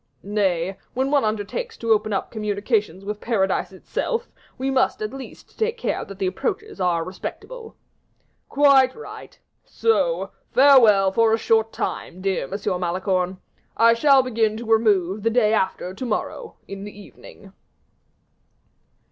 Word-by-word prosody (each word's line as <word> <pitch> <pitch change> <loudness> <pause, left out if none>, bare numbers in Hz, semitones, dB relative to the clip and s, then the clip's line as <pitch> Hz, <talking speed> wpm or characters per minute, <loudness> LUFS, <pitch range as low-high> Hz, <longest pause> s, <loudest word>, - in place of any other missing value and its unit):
"Nay; 190 -3 -1 0.2
when 265 +2 0
one 285 -2 +3
undertakes 220 - -3
to 230 -1 -2
open 215 0 +2
up 195 - -2
communications 210 -3 -2
with 210 0 -5
paradise 195 -6 0
itself, 465 - -3 0.3
we 270 +1 -1
must 260 -1 +1
at 215 +2 -4
least 270 -1 -11
take 455 +2 0
care - - -2
that 195 - -10
the 195 - -2
approaches 425 - -3
are 175 -2 +1
respectable." 450 - -8 0.7
"Quite 275 -2 +5
right; 455 - -11 0.3
so - - 0 0.2
farewell 230 -8 +6
for 225 +2 +3
a - - +3
short 225 0 +2
time, 180 - -4
dear 190 -4 -1
M. - - -13 0.3
Malicorne. 185 +1 -1 0.4
I 230 0 +6
shall 270 +2 +5
begin 225 -3 0
to 235 - -7
remove 210 -4 +2
the 230 - +1
day 225 -2 +2
after 190 -3 -1
to 255 - -6
morrow, 440 - -4
in 195 0 -7
the 205 0 -10
evening." 200 -1 -15
215 Hz, 145 wpm, -22 LUFS, 195-265 Hz, 0.7 s, farewell